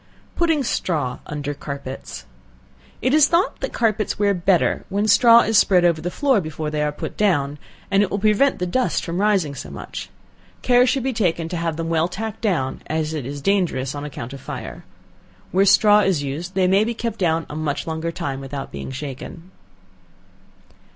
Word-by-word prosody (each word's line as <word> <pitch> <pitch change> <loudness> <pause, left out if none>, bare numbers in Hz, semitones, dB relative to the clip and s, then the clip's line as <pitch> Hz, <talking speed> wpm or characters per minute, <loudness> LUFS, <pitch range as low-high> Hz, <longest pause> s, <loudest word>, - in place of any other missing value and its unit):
Putting 325 -4 +2
Straw 150 - -1
under 145 -1 -4
Carpets. 135 - -7 0.8
It 255 - +2
is 300 -1 +6
thought 340 +4 +1
that - - -3
carpets 215 -3 0
wear 205 -1 +2
better 180 0 +1
when 200 +2 0
straw 230 +2 +7
is 220 -2 +3
spread 180 -3 +4
over 170 -2 +2
the 175 - -2
floor 265 +1 +2
before 155 -1 -5
they 150 0 -1
are 150 0 0
put 145 - -6
down, 145 -8 +1 0.3
and 195 0 +4
it 205 - +1
will 200 - -2
prevent 215 +7 +3
the 180 - -2
dust 250 +9 0
from 175 +2 -2
rising 195 -8 +2
so - - -8
much. - - -7 0.5
Care 250 0 +5
should 270 -1 +1
be 265 0 -1
taken 170 -7 0
to 175 - -4
have 165 -1 -2
them 165 0 -3
well 165 0 +2
tacked 215 +4 -6
down, 170 - -1
as 155 0 -2
it 145 -5 -4
is 145 +1 -6
dangerous 175 -10 0
on 145 0 -6
account 135 -3 -7
of 135 - -9
fire. - - -7 0.7
Where 195 +2 +3
straw 205 +1 +6
is 190 -8 +1
used, 160 +7 -5
they 190 -1 +3
may 195 +3 +4
be 235 +1 -2
kept 230 -1 -4
down 165 -3 +1
a - - -8
much 155 -2 -2
longer 160 +1 -3
time 135 -4 -4
without 135 0 -6
being 70 -1 -6
shaken. 145 +6 -8
175 Hz, 190 wpm, -21 LUFS, 150-210 Hz, 0.8 s, straw